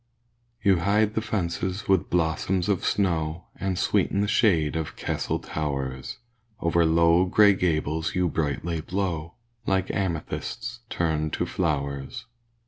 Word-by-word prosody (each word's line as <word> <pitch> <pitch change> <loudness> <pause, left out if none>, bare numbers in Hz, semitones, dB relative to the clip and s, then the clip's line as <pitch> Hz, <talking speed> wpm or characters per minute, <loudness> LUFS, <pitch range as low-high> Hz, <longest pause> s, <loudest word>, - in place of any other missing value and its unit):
You 95 -3 +4
hide 105 +4 +2
the 110 - 0
fences 95 -2 -2
with 95 -3 +2
blossoms 90 +2 0
of 100 -4 +1
snow, 85 -4 0
And 95 -2 -2
sweeten 100 - +1
the 105 - +1
shade 85 -9 +3
of 80 -2 -3
castle - - -2
towers; 70 -4 -4 0.4
Over 85 0 +2
low, 85 +2 +4
grey 100 +2 +6
gables 80 -3 0
you 90 -1 +2
brightly 80 +2 -2
blow, 85 -2 -3 0.3
Like 95 -1 +1
amethysts 95 +6 -3
turned 80 -2 -1
to - - 0
flowers. 70 -4 -2
85 Hz, 130 wpm, -26 LUFS, 80-95 Hz, 0.4 s, grey